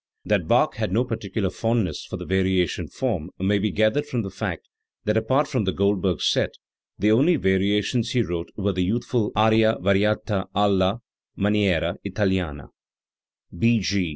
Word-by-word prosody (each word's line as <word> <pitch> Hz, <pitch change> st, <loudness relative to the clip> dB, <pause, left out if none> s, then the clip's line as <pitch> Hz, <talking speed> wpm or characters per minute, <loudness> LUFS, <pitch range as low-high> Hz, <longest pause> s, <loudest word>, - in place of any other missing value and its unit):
That -, -, 0 dB
Bach -, -, +2 dB
had -, -, -2 dB
no 115 Hz, +6 st, +2 dB
particular 105 Hz, -4 st, -3 dB
fondness 115 Hz, -8 st, -1 dB
for -, -, -6 dB
the -, -, -7 dB
variation 95 Hz, -2 st, 0 dB
form 100 Hz, -11 st, -3 dB
may 100 Hz, +2 st, +1 dB
be 105 Hz, +2 st, 0 dB
gathered 110 Hz, +9 st, +1 dB
from 120 Hz, -5 st, -2 dB
the 95 Hz, -, -6 dB
fact 95 Hz, -, -5 dB, 0.4 s
that 105 Hz, -, +1 dB
apart 130 Hz, +7 st, +2 dB
from 130 Hz, -7 st, -1 dB
the 95 Hz, -, +1 dB
Goldberg 100 Hz, -1 st, 0 dB
set, -, -, +1 dB, 0.4 s
the 105 Hz, -, +2 dB
only 145 Hz, +11 st, +4 dB
variations 105 Hz, +2 st, +1 dB
he 125 Hz, -2 st, +2 dB
wrote 85 Hz, -3 st, -4 dB
were 100 Hz, -1 st, 0 dB
the 90 Hz, 0 st, 0 dB
youth 110 Hz, +7 st, -1 dB
ful 115 Hz, -4 st, 0 dB
Ana 110 Hz, +1 st, +4 dB
variata 100 Hz, +1 st, +1 dB
alia 100 Hz, +1 st, +2 dB, 0.4 s
maniera 100 Hz, -4 st, +1 dB
italiana 95 Hz, -7 st, -2 dB, 0.9 s
(B. 115 Hz, +6 st, +3 dB
105 Hz, 155 wpm, -23 LUFS, 95-115 Hz, 0.9 s, only